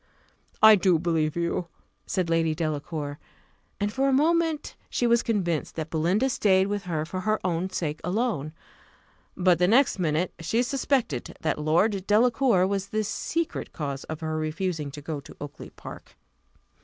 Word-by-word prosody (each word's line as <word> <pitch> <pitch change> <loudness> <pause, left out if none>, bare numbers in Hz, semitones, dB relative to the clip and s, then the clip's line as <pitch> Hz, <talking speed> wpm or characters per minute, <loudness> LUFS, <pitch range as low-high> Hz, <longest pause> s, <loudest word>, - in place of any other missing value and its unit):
"I 220 -1 +10
do 185 -3 +3
believe 160 -2 0
you," 170 +1 -1 0.4
said 185 -3 0
Lady 165 -1 +1
Delacour; 150 -2 -3 0.6
and 205 0 -1
for 270 +2 +2
a - - +2
moment 320 +2 +1
she 245 - 0
was 235 0 +4
convinced 175 -8 -1
that 160 -1 -5
Belinda 175 +10 +2
stayed 190 -6 +3
with 205 -1 -3
her 160 -3 -2
for 185 +3 -5
her 215 +3 0
own 180 +1 0
sake 155 -4 -3
alone; 180 - -1 0.9
but 180 -2 +3
the 180 - +4
next 245 0 +4
minute 165 +1 0
she 225 +9 +1
suspected 255 - -1
that 155 - -1
Lord 185 +6 +1
Delacour 225 -2 +4
was 195 0 -1
the 215 +1 -1
secret 330 +10 -3
cause 140 -4 -4
of 155 0 -6
her 155 0 -2
refusing 155 -1 -2
to 145 +1 -9
go 155 -1 -4
to 140 - -13
Oakly 145 +1 -8
park. - - -11
180 Hz, 160 wpm, -26 LUFS, 155-215 Hz, 0.9 s, I